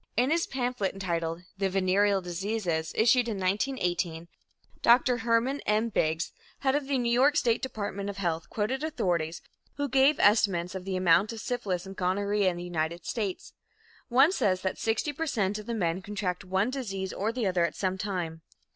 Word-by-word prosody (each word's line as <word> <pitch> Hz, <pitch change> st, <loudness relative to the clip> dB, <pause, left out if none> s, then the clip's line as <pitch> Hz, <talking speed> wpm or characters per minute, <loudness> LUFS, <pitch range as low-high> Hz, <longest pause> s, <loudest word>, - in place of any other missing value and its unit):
In 250 Hz, +4 st, +3 dB
his 335 Hz, +1 st, +1 dB
pamphlet 245 Hz, -6 st, -2 dB
entitled 170 Hz, -3 st, -2 dB, 0.2 s
"The 195 Hz, -1 st, +1 dB
Venereal 195 Hz, +1 st, +2 dB
Diseases," 180 Hz, -2 st, -2 dB
issued 240 Hz, +2 st, +4 dB
in 215 Hz, -, -2 dB
1918, 180 Hz, -5 st, -1 dB, 0.5 s
Dr. 245 Hz, +1 st, +5 dB
Hermann 235 Hz, +4 st, +1 dB
M. 215 Hz, +2 st, +2 dB
Biggs 160 Hz, -5 st, 0 dB, 0.3 s
head 265 Hz, -1 st, +2 dB
of 290 Hz, -1 st, -1 dB
the 275 Hz, -1 st, +1 dB
New 240 Hz, -2 st, 0 dB
York 275 Hz, +5 st, +4 dB
State 230 Hz, -2 st, +2 dB
Department 200 Hz, -5 st, -4 dB
of 200 Hz, -, -6 dB
Health 170 Hz, -4 st, -2 dB
quoted 255 Hz, +7 st, -2 dB
authorities 175 Hz, -, -1 dB, 0.3 s
who 285 Hz, 0 st, -1 dB
gave 275 Hz, +2 st, +4 dB
estimates 195 Hz, -4 st, +3 dB
of 190 Hz, -1 st, -6 dB
the 195 Hz, -1 st, -2 dB
amount 185 Hz, +4 st, +3 dB
of 225 Hz, -, -7 dB
syphilis 205 Hz, -7 st, -2 dB
and 195 Hz, 0 st, -8 dB
gonorrhea 200 Hz, +2 st, +1 dB
in 175 Hz, -, -4 dB
the 175 Hz, -, -5 dB
United 170 Hz, -1 st, -3 dB
States. 205 Hz, -5 st, -3 dB, 0.6 s
One 270 Hz, +7 st, +5 dB
says 200 Hz, -, +1 dB
that 190 Hz, -, -2 dB
60 225 Hz, +7 st, 0 dB
per 325 Hz, +3 st, -3 dB
cent 210 Hz, -6 st, 0 dB
of 210 Hz, -, -10 dB
the 235 Hz, -, -2 dB
men 180 Hz, -3 st, -1 dB
contract 190 Hz, -2 st, -3 dB
one 190 Hz, +5 st, 0 dB
disease 195 Hz, -8 st, -4 dB
or 210 Hz, +3 st, -1 dB
the 235 Hz, -1 st, -2 dB
other 180 Hz, -2 st, +2 dB
at 170 Hz, -, -1 dB
some 190 Hz, -1 st, -2 dB
time. 175 Hz, -5 st, -3 dB
200 Hz, 180 wpm, -28 LUFS, 180-240 Hz, 0.6 s, Dr